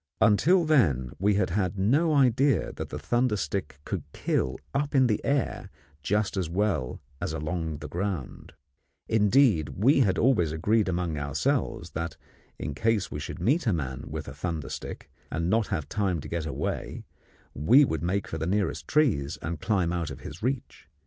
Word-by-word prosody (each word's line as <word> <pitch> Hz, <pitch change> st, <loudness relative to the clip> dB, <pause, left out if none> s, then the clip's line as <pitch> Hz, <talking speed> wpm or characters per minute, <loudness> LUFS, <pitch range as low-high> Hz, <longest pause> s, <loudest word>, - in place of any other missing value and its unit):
Until 160 Hz, -, +4 dB
then 75 Hz, -, +3 dB
we 100 Hz, +2 st, +3 dB
had 95 Hz, -4 st, +1 dB
had 95 Hz, 0 st, 0 dB
no 145 Hz, -, +3 dB
idea 135 Hz, +1 st, +3 dB
that -, -, -6 dB
the -, -, -5 dB
thunder 120 Hz, -, +1 dB
stick 75 Hz, -4 st, -3 dB
could -, -, -3 dB
kill 65 Hz, -, -1 dB, 0.2 s
up 145 Hz, +1 st, -1 dB
in 130 Hz, -1 st, +6 dB
the 110 Hz, -4 st, 0 dB
air 140 Hz, -3 st, -1 dB, 0.3 s
just 105 Hz, +6 st, 0 dB
as 90 Hz, -4 st, -1 dB
well 90 Hz, -8 st, -1 dB, 0.2 s
as 80 Hz, -, -2 dB
along 80 Hz, 0 st, -3 dB
the 75 Hz, -, -7 dB
ground; 90 Hz, -5 st, -4 dB, 0.5 s
indeed, 105 Hz, -, +4 dB
we 130 Hz, +9 st, +4 dB
had 100 Hz, -8 st, +3 dB
always 110 Hz, -, +3 dB
agreed 105 Hz, +6 st, +1 dB
among 85 Hz, -4 st, -1 dB
ourselves 110 Hz, -, -1 dB
that, 80 Hz, +1 st, -4 dB, 0.4 s
in 75 Hz, -, -4 dB
case 110 Hz, +5 st, 0 dB
we 75 Hz, -, -4 dB
should -, -, -6 dB
meet 145 Hz, +4 st, +1 dB
a 110 Hz, -, +3 dB
man 65 Hz, -6 st, -3 dB
with -, -, -5 dB
a -, -, -7 dB
thunder 80 Hz, -6 st, -4 dB
stick -, -, -7 dB, 0.2 s
and 85 Hz, +4 st, -1 dB
not 110 Hz, -1 st, +2 dB
have 80 Hz, -8 st, -2 dB
time 95 Hz, -2 st, 0 dB
to -, -, -8 dB
get 85 Hz, -2 st, -3 dB
away, 70 Hz, -, -3 dB, 0.5 s
we 120 Hz, -, +5 dB
would 80 Hz, -, -2 dB
make 95 Hz, +3 st, -1 dB
for 80 Hz, -, -5 dB
the 80 Hz, -, -2 dB
nearest 100 Hz, +1 st, -1 dB
trees 105 Hz, -, +2 dB
and 85 Hz, -1 st, -4 dB
climb 95 Hz, -6 st, +1 dB
out 85 Hz, -3 st, -2 dB
of -, -, -8 dB
his -, -, -9 dB
reach. 130 Hz, -, -3 dB
95 Hz, 180 wpm, -27 LUFS, 80-115 Hz, 0.5 s, in